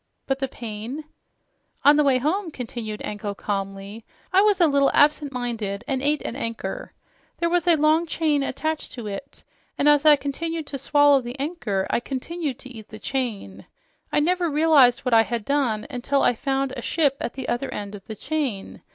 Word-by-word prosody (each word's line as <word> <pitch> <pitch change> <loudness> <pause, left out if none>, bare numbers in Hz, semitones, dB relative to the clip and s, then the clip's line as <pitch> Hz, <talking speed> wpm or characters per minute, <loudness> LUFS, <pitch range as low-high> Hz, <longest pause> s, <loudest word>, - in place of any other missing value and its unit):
"But 270 0 -1
the 270 - -1
pain 235 +5 -6 0.4
" - - -37
"On 290 +1 +8
the 300 - +4
way 270 -2 +4
home," 330 +8 -1
continued 230 -6 -6
Anko 205 -1 -4
calmly, 195 +2 -4 0.3
"I 380 - +6
was 410 -2 +3
a 345 - +6
little 280 -2 +3
absent 295 -1 +4
minded 230 -5 -3
and 265 -3 -1
ate 295 +2 +1
an - - -4
anchor. 230 -4 -5 0.4
There 335 0 0
was 355 -1 +1
a 340 - +6
long 310 +2 +3
chain 310 -3 +1
attached 310 +3 -3
to 240 -4 -7
it, 200 -1 -7 0.3
and 285 - +2
as 295 -1 +5
I 305 -1 +8
continued 320 +3 -4
to 280 -1 -6
swallow 290 0 +4
the 245 +2 -8
anchor 255 - -2
I - - +2
continued 275 +2 -4
to 260 - -11
eat 220 -4 -11
the 215 - -9
chain. 215 - -4 0.4
I - - +3
never 350 +2 +1
realized 290 -5 +5
what 250 - -1
I 225 - +8
had 230 -1 -3
done 255 -7 0
until 275 0 0
I - - +4
found 270 +2 -1
a 240 - -5
ship 285 +1 +1
on - - -1
the 265 -1 -5
other 240 +3 -2
end 205 0 -5
of 200 -2 -11
the 220 - -6
chain. 270 -6 -3
270 Hz, 195 wpm, -24 LUFS, 225-300 Hz, 0.4 s, On